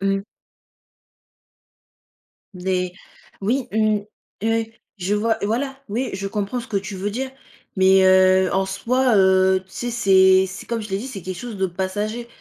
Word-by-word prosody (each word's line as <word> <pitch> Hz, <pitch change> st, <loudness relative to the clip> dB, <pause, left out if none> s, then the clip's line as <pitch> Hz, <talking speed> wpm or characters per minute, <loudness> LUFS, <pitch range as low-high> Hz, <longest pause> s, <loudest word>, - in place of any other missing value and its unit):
mmh. 195 Hz, 0 st, 0 dB, 2.3 s
Des 180 Hz, 0 st, -2 dB, 0.5 s
oui, 240 Hz, +6 st, 0 dB
mmh. 215 Hz, 0 st, +2 dB, 0.4 s
Heu, 225 Hz, 0 st, +1 dB, 0.3 s
je 190 Hz, +2 st, -1 dB
vois 220 Hz, +2 st, +1 dB
voilà, 270 Hz, +6 st, -2 dB
oui, 235 Hz, +5 st, -2 dB
je 195 Hz, +1 st, -3 dB
comprends 205 Hz, +3 st, -3 dB
ce 240 Hz, -, -8 dB
que 200 Hz, -, -1 dB
tu 195 Hz, +1 st, -5 dB
veux 195 Hz, +2 st, -3 dB
dire, 260 Hz, +5 st, -3 dB, 0.5 s
mais 190 Hz, 0 st, +5 dB
heu, 185 Hz, 0 st, +5 dB
en 190 Hz, 0 st, +1 dB
soi, 235 Hz, +6 st, +1 dB
heu, 190 Hz, -1 st, +4 dB
tu -, -, -30 dB
sais? 240 Hz, +4 st, -4 dB
C'est 190 Hz, -4 st, +5 dB
c'est 190 Hz, +2 st, -9 dB
comme 235 Hz, -1 st, -3 dB
je 210 Hz, -, -8 dB
l'ai 195 Hz, -, -1 dB
dit, 230 Hz, +6 st, -6 dB
c'est 235 Hz, -7 st, -7 dB
quelque 185 Hz, +1 st, -6 dB
chose 235 Hz, +1 st, -7 dB
de 190 Hz, 0 st, +1 dB
passager. 205 Hz, +6 st, -3 dB
195 Hz, 165 wpm, -22 LUFS, 190-225 Hz, 2.3 s, mais